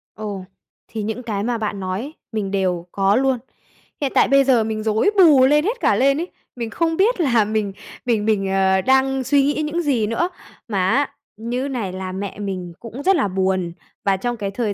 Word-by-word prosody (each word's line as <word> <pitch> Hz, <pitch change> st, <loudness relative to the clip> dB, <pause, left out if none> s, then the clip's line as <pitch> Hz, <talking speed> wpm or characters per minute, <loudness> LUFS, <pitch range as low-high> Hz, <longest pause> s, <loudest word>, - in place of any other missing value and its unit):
Ồ, 205 Hz, -3 st, -5 dB, 0.4 s
thì 220 Hz, -2 st, -5 dB
những 220 Hz, +4 st, -4 dB
cái 205 Hz, -3 st, -2 dB
mà 240 Hz, 0 st, -1 dB
bạn 210 Hz, -2 st, -3 dB
nói 185 Hz, +1 st, -3 dB
ấy 285 Hz, +5 st, -7 dB, 0.2 s
mình 210 Hz, -3 st, -2 dB
đều 185 Hz, -3 st, 0 dB
có 195 Hz, +1 st, +2 dB
luôn. 265 Hz, 0 st, +2 dB, 0.6 s
Hiện 275 Hz, -2 st, 0 dB
tại -, -, +5 dB
bây 275 Hz, 0 st, +5 dB
giờ 255 Hz, -4 st, +3 dB
mình 215 Hz, 0 st, -3 dB
rối 220 Hz, -, +2 dB
bù 300 Hz, -9 st, +7 dB
lên 295 Hz, +3 st, +4 dB
hết 475 Hz, +3 st, -1 dB
cả -, -, +3 dB
lên 275 Hz, +1 st, +3 dB
ấy, 345 Hz, -, -3 dB, 0.3 s
mình 235 Hz, -2 st, -4 dB
không 325 Hz, +4 st, -1 dB
biết 425 Hz, +3 st, +3 dB
là 235 Hz, -8 st, +3 dB
mình 210 Hz, -2 st, -1 dB, 0.3 s
mình 225 Hz, -4 st, +1 dB
mình, 195 Hz, -3 st, +1 dB
ờ, 190 Hz, 0 st, +3 dB
đang 265 Hz, +1 st, +2 dB
suy 275 Hz, +2 st, +3 dB
nghĩ 295 Hz, +2 st, 0 dB
những 335 Hz, +3 st, -1 dB
gì 255 Hz, -9 st, +1 dB
nữa. 230 Hz, +11 st, 0 dB, 0.4 s
Mà 190 Hz, -4 st, 0 dB
á, 280 Hz, +4 st, +2 dB, 0.3 s
như 245 Hz, +4 st, -3 dB
này 230 Hz, -9 st, -3 dB
là 185 Hz, 0 st, -5 dB
mẹ 195 Hz, +1 st, -5 dB
mình 185 Hz, -4 st, -4 dB
cũng 235 Hz, +4 st, -8 dB
rất 385 Hz, +3 st, +4 dB
là 205 Hz, -, +1 dB
buồn, 185 Hz, -2 st, -1 dB, 0.3 s
và 195 Hz, -1 st, +3 dB
trong 240 Hz, +4 st, -3 dB
cái 200 Hz, -2 st, -3 dB
thời 210 Hz, 0 st, -2 dB
225 Hz, 215 wpm, -21 LUFS, 195-270 Hz, 0.6 s, bù